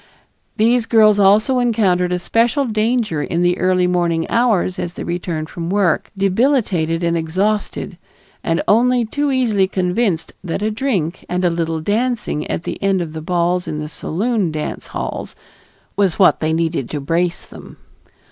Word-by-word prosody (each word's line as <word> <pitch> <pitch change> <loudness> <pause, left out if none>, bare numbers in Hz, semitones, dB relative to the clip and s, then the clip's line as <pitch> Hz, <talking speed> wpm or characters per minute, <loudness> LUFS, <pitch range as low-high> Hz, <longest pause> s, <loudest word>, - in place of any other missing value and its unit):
These 230 +1 +2
girls 215 -2 +5
also 215 +6 +4
encountered 195 -7 +1
a 180 - +1
special 235 +9 +1
danger 220 - 0
in 170 +3 -1
the 175 +1 +1
early 185 -1 +2
morning 170 -2 0
hours 220 -6 +1
as 175 0 -4
they - - -5
returned 170 -2 -3
from 170 0 -6
work, 190 -4 +1
debilitated 195 - +1
and 170 0 +1
exhausted, 190 +6 -2 0.4
and 165 0 0
only 245 +2 +3
too 285 +6 -1
easily 225 -7 +2
convinced 185 -1 -1
that 180 +2 -3
a 215 - 0
drink 210 - -2
and 180 +1 0
a 175 - +3
little 165 -1 -2
dancing 215 -4 -1
at - - -2
the - - -5
end 195 -1 +2
of 165 -3 -4
the 160 - -6
balls 175 +2 0
in 155 - -3
the 150 0 -4
saloon 195 +4 -1
dance 155 -1 -5
halls, - - -5 0.6
was 195 -4 +1
what 190 - +5
they 155 0 0
needed 160 -5 -1
to 150 - -3
brace 170 +5 -1
them. - - -13
185 Hz, 165 wpm, -18 LUFS, 170-220 Hz, 0.6 s, girls